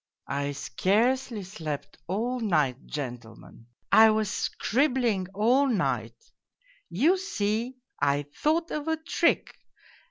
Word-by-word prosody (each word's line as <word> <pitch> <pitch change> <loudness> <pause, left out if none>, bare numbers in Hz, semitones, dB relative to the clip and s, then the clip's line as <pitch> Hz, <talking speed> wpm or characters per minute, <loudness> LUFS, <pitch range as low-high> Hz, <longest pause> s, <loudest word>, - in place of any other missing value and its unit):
" - - -52 0.2
I 145 - -3
scarcely 220 - 0
slept 160 -6 -6
all 235 +8 -1
night, 150 - 0
gentlemen. 120 -5 -8 0.2
I 220 0 +8
was 215 -2 +1
scribbling 240 -8 0
all 245 +7 +3
night: 130 - -1 0.7
you 315 - +3
see, 235 - -2 0.2
I 145 0 +2
thought 330 +2 0
of 300 0 -3
a 320 0 +1
trick. 320 - +1
215 Hz, 115 wpm, -27 LUFS, -, 0.7 s, I